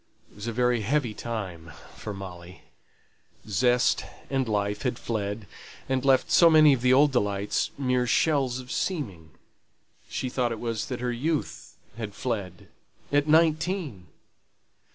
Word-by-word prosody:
It - - -23
was 105 +2 -6
a - - -1
very 125 0 +1
heavy 120 +1 0
time 95 -9 -6 0.2
for 105 - -7
Molly, 90 -2 -9 0.8
zest 120 +5 +2 0.3
and 135 -3 0
life 105 -1 -1
had 125 -2 -1
fled, 105 -2 -3 0.4
and 130 -1 0
left 135 -1 +3
so 170 - +7
many 155 -2 +7
of 130 - -1
the 125 0 +3
old 140 +3 +5
delights 100 -5 0
mere 125 -2 +1
shells 135 -1 +2
of 125 -1 -9
seeming. 100 - -3 0.8
She 130 - -3
thought 125 -1 -1
it 115 - -4
was 115 -2 -3
that 125 -2 -5
her 125 0 -1
youth 150 +6 -3 0.2
had 105 -3 -5
fled; 100 -8 -4 0.4
at 145 +1 +2
nineteen! 155 - +1
120 Hz, 145 wpm, -26 LUFS, 105-135 Hz, 0.8 s, so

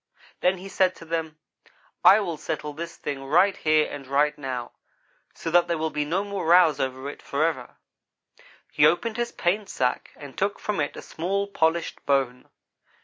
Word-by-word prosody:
"Then 180 +1 +2
he 185 +2 -9
said 185 -1 +1
to 165 - -12
them: 160 -1 -3 0.7
'I 205 +3 +8
will 170 -6 -3
settle 150 0 -4
this 165 +2 -7
thing 140 -2 -5
right 180 +8 +3
here 155 -1 +2
and 135 -2 -8
right 145 +2 +2
now, 130 -4 -5 0.6
so 165 - -4
that 175 +1 +4
there 170 -1 0
will 160 0 -2
be 150 0 -1
no 180 +6 0
more 200 -1 -4
rows 170 -4 +6
over 130 +1 -3
it, 145 - -8
forever.' 140 -3 -2 1.0
"He 145 - +2
opened 220 +8 0
his 240 0 -1
paint 195 +4 -1
sack 125 -1 -1
and 145 -2 -11
took 200 +1 -1
from 210 -5 -3
it 145 - -2
a - - -8
small, 195 +5 -2
polished 170 -4 -1
bone. 135 -3 0
160 Hz, 180 wpm, -25 LUFS, 145-185 Hz, 1.0 s, I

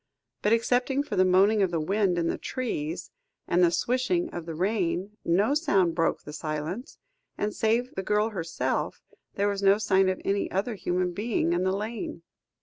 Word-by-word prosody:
But, 210 - +1
excepting 250 +4 +2
for 295 - -5
the 185 - +5
moaning 195 +4 +4
of 190 - +3
the 170 -1 -1
wind 190 +2 +1
in 170 - +1
the - - -1
trees, 170 -10 -4 0.4
and 175 +1 +3
the 175 - +6
swishing 230 -2 0
of 170 -1 -6
the 165 - -5
rain, 190 +1 -1
no 200 +10 +2
sound 200 - +2
broke 165 -1 0
the 150 - -9
silence, 155 - -4 0.4
and 210 0 -1
save 230 +3 +1
the 190 - -3
girl 210 +3 +1
herself, 165 - -2 0.3
there 200 +1 +1
was 200 -1 -1
no 195 0 +5
sign 195 -3 +3
of 185 - -1
any 200 0 0
other 200 +6 -1
human 180 -2 -1
being 205 -4 0
in 175 +1 +1
the 190 - +2
lane. 210 -4 -5
195 Hz, 185 wpm, -27 LUFS, 175-215 Hz, 0.4 s, the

